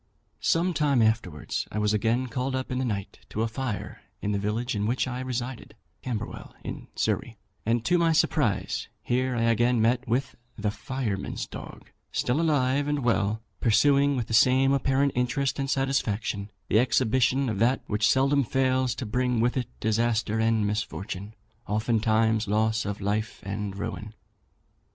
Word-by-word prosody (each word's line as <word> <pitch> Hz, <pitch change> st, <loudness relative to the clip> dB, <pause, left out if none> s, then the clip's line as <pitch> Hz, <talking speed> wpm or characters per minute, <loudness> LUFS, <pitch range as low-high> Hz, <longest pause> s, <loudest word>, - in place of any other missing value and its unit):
"Some 175 Hz, +2 st, +2 dB
time 145 Hz, -5 st, +2 dB
afterwards, 110 Hz, -9 st, -1 dB
I -, -, -4 dB
was 105 Hz, 0 st, +2 dB
again 115 Hz, +4 st, +1 dB
called 130 Hz, +2 st, -2 dB
up 130 Hz, 0 st, -3 dB
in 125 Hz, -, -1 dB
the -, -, 0 dB
night 100 Hz, -4 st, -4 dB
to 110 Hz, -, -1 dB
a -, -, +1 dB
fire 115 Hz, -2 st, -4 dB, 0.2 s
in 105 Hz, -, -2 dB
the 100 Hz, -, 0 dB
village 110 Hz, +5 st, -1 dB
in 105 Hz, 0 st, 0 dB
which 125 Hz, +3 st, 0 dB
I 125 Hz, 0 st, -4 dB
resided 130 Hz, -1 st, -4 dB, 0.3 s
(Camberwell, 120 Hz, -5 st, -5 dB
in -, -, -6 dB
Surrey), -, -, -1 dB, 0.3 s
and 115 Hz, 0 st, +1 dB
to 175 Hz, 0 st, +3 dB
my 165 Hz, -1 st, +3 dB
surprise 160 Hz, -, +1 dB, 0.2 s
here 125 Hz, +1 st, 0 dB
I 115 Hz, -, 0 dB
again 120 Hz, +1 st, +3 dB
met 120 Hz, +3 st, +2 dB
with 130 Hz, +3 st, -1 dB, 0.2 s
'the 105 Hz, -1 st, -1 dB
firemen's 110 Hz, -4 st, -3 dB
dog,' -, -, -10 dB, 0.2 s
still 125 Hz, +6 st, +1 dB
alive 145 Hz, -3 st, +2 dB
and 145 Hz, -2 st, 0 dB
well, 110 Hz, -2 st, +1 dB, 0.2 s
pursuing, 140 Hz, +4 st, +4 dB
with 120 Hz, -3 st, -1 dB
the 110 Hz, -, -6 dB
same 130 Hz, +4 st, +5 dB
apparent 135 Hz, +1 st, +2 dB
interest 130 Hz, +3 st, 0 dB
and 135 Hz, 0 st, -1 dB
satisfaction, 115 Hz, -7 st, -1 dB, 0.2 s
the 110 Hz, -, +4 dB
exhibition 130 Hz, +2 st, +2 dB
of 105 Hz, -4 st, -2 dB
that 120 Hz, +4 st, +2 dB
which 105 Hz, +1 st, +1 dB
seldom 140 Hz, +1 st, +3 dB
fails 130 Hz, -1 st, +1 dB
to 130 Hz, -, -4 dB
bring 125 Hz, +2 st, 0 dB
with 120 Hz, +2 st, +2 dB
it 125 Hz, -3 st, -1 dB
disaster 110 Hz, 0 st, +1 dB
and 110 Hz, -1 st, +2 dB
misfortune, 100 Hz, -1 st, -4 dB, 0.3 s
oftentimes 110 Hz, 0 st, +2 dB
loss 110 Hz, +2 st, +1 dB
of 100 Hz, 0 st, -4 dB
life 105 Hz, +2 st, -1 dB
and 100 Hz, 0 st, -4 dB
ruin. 105 Hz, +1 st, -5 dB
120 Hz, 165 wpm, -27 LUFS, 110-130 Hz, 0.3 s, same